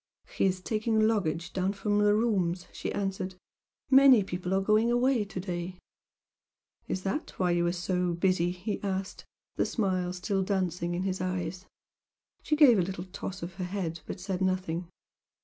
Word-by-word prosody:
"He - - +2
is 185 -1 +1
taking 220 +2 0
luggage 180 -6 -1
down 190 +1 0
from 205 +1 0
the 210 0 +4
rooms," 190 -6 +1
she - - -4
answered 190 -2 -3 0.6
"Many 265 -5 +8
people 180 -1 -4
are - - +3
going 215 +4 +3
away 245 -1 +3
to 195 - -6
day." 180 -1 -4 1.1
"Is 185 - -3
that 200 +11 -3
why 180 -2 +2
you 175 0 +2
are - - +2
'so 180 0 -1
busy'"? 175 -1 +2
he 180 +4 -4
asked, 195 -1 -3 0.3
the - - +2
smile 185 -5 0
still 185 +2 -1
dancing 180 -3 -1
in 180 - -2
his 190 -1 -2
eyes. 185 0 -3 0.7
She 305 - +1
gave 270 -8 +7
a - - +4
little 180 0 -4
toss 190 -1 -6
of 175 +2 -5
her - - -1
head 180 -3 -3
but 185 - -5
said 190 0 -3
nothing. 185 -2 -1
185 Hz, 170 wpm, -29 LUFS, 180-205 Hz, 1.1 s, Many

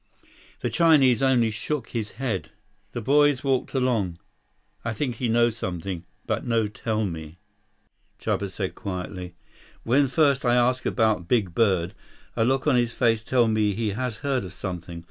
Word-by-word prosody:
The - - -1
Chinese 150 -7 +5
only 125 -4 +3
shook 110 +4 -3
his 110 -3 -4
head. 120 -8 -3 0.4
The 120 - -4
boys 145 +1 +4
walked 135 0 0
along. 115 -10 0 0.7
"I 115 - -2
think 120 0 -2
he 120 -1 -1
know 120 +1 +4
something, 90 -5 -5 0.2
but - - -1
no 115 -2 +1
tell 110 +1 -2
me," 80 -2 -6 0.8
Chuba 100 - -1
said 95 0 -4
quietly. 90 -2 -6 0.5
"When 135 +4 +3
first 140 -1 +2
I 120 -1 +3
ask 125 +1 +2
about 110 -7 +1
big 100 -7 +1
bird, 95 -5 +2 0.4
a - - +2
look 130 +3 +1
on 145 -5 +4
his 120 -1 0
face 115 -2 +2
tell 120 0 +3
me 110 -2 +1
he 110 0 -1
has 115 +2 -3
heard 135 -4 +1
of 95 0 -8
something. 85 -3 -6
115 Hz, 165 wpm, -25 LUFS, 100-130 Hz, 0.8 s, Chinese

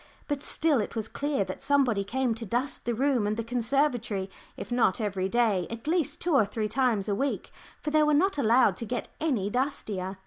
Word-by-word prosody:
But 290 -2 -2
still 300 -4 +1
it 210 - -5
was 220 -1 -2
clear 285 -5 -1
that 185 0 -7
somebody 260 -8 +2
came 245 +4 0
to 225 +1 -6
dust 240 +6 -2
the 240 0 0
room 255 -4 +1
and 210 +1 -1
the 230 - -1
conservatory, 240 -4 0 0.3
if - - -7
not 240 -5 +2
every 195 -3 -1
day, 210 -6 +2
at 230 0 -7
least 315 -2 0
two 345 -1 0
or 270 - +6
three 215 +1 -2
times 235 -5 +1
a 205 - +1
week, 275 +7 -2 0.3
for 300 - -3
they 310 0 +4
were 300 0 +4
not 365 +1 +2
allowed 230 -5 +4
to 230 - -4
get 245 +2 -4
any 240 -11 0
dustier. 205 -8 -2
240 Hz, 210 wpm, -28 LUFS, 210-280 Hz, 0.3 s, or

